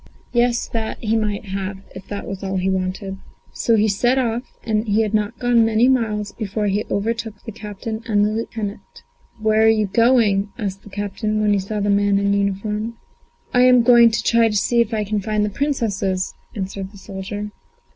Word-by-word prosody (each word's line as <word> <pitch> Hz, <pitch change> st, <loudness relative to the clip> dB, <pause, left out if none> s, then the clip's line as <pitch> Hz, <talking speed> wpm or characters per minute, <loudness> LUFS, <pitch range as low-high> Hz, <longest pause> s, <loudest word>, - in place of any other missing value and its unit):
Yes, 240 Hz, 0 st, +2 dB
that 225 Hz, -1 st, -3 dB
he 225 Hz, 0 st, -1 dB
might 215 Hz, -1 st, -1 dB
have 195 Hz, 0 st, -4 dB, 0.2 s
if 190 Hz, 0 st, -10 dB
that 205 Hz, -1 st, -5 dB
was 195 Hz, -1 st, -6 dB
all 195 Hz, 0 st, -2 dB
he 185 Hz, +1 st, +1 dB
wanted. 190 Hz, +1 st, -3 dB, 0.4 s
So 230 Hz, -, +2 dB
he 215 Hz, 0 st, +3 dB
set 240 Hz, +6 st, +2 dB
off, 240 Hz, -2 st, 0 dB, 0.2 s
and 220 Hz, 0 st, -1 dB
he 215 Hz, +2 st, +3 dB
had 215 Hz, -1 st, -3 dB
not 210 Hz, +2 st, 0 dB
gone 245 Hz, -1 st, +3 dB
many 225 Hz, +2 st, +3 dB
miles 215 Hz, -5 st, +1 dB
before 210 Hz, -1 st, -3 dB
he 205 Hz, +1 st, +1 dB
overtook 225 Hz, +1 st, -2 dB
the 225 Hz, -, -5 dB
captain 215 Hz, +1 st, -6 dB
and 205 Hz, -2 st, +3 dB
the 210 Hz, -, 0 dB
lieutenant. 215 Hz, -2 st, -4 dB, 0.6 s
"Where 215 Hz, 0 st, +2 dB
are 220 Hz, -, +6 dB
you 215 Hz, -1 st, +3 dB
going?" 210 Hz, -2 st, +3 dB
asked 195 Hz, -4 st, -4 dB
the -, -, -14 dB
captain, 205 Hz, +2 st, -2 dB
when 210 Hz, -1 st, +3 dB
he 200 Hz, -, +2 dB
saw 205 Hz, +2 st, -3 dB
the 205 Hz, 0 st, +1 dB
man 200 Hz, 0 st, +3 dB
in 200 Hz, 0 st, +1 dB
uniform. 210 Hz, +3 st, -1 dB, 0.6 s
"I'm 250 Hz, -1 st, +6 dB
going 235 Hz, -1 st, +7 dB
to 225 Hz, -, -2 dB
try 230 Hz, -1 st, +4 dB
if 230 Hz, +2 st, +1 dB
I 215 Hz, -2 st, 0 dB
can 210 Hz, +1 st, -1 dB
find 210 Hz, +1 st, 0 dB
the 210 Hz, -, -3 dB
Princesses," 200 Hz, -8 st, -1 dB, 0.2 s
answered 195 Hz, -1 st, -5 dB
the 200 Hz, -, -14 dB
soldier. 205 Hz, +2 st, -6 dB
210 Hz, 190 wpm, -21 LUFS, 200-225 Hz, 0.6 s, going